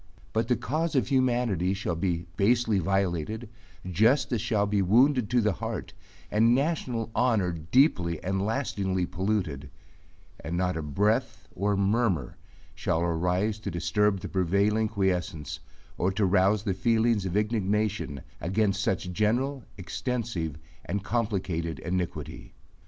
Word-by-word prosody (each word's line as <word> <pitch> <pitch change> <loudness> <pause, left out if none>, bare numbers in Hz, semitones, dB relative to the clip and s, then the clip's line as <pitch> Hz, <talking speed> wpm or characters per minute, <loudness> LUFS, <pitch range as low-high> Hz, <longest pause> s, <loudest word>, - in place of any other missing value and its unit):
But 110 +1 +1
the 125 - +3
cause 155 +8 -2
of 130 - +2
humanity 120 - +1
shall 95 -3 -2
be 85 -1 -1
basely 110 +1 +2
violated, 95 +2 -1 0.4
justice 115 - +2
shall 110 -4 +1
be 100 -1 +1
wounded 120 +4 +4
to 120 0 +3
the 105 -1 +2
heart, - - -5 0.4
and 115 +3 +4
national 130 -6 -1
honor 110 -8 +2
deeply 85 - +2
and 95 +1 -1
lastingly 100 -6 -1
polluted, 90 -6 -2 0.7
and 85 +3 -4
not 90 0 0
a 80 - -2
breath 105 - 0
or 100 +2 0
murmur 100 - +1 0.4
shall 80 - -1
arise 90 +5 0
to - - -4
disturb 90 +4 +1
the 100 - -5
prevailing 100 +4 +1
quiescence 90 -8 -2 0.4
or 90 +2 +2
to 100 +1 +1
rouse 95 +2 +3
the 100 -4 0
feelings 110 +1 +2
of 95 +2 -1
indignation 105 - 0 0.2
against 100 +2 +1
such 90 -3 -1
general, 120 +6 0
extensive, 95 - -3 0.3
and 100 +2 -3
complicated 95 -8 -1
iniquity. 90 0 -4
100 Hz, 130 wpm, -27 LUFS, 90-115 Hz, 0.7 s, wounded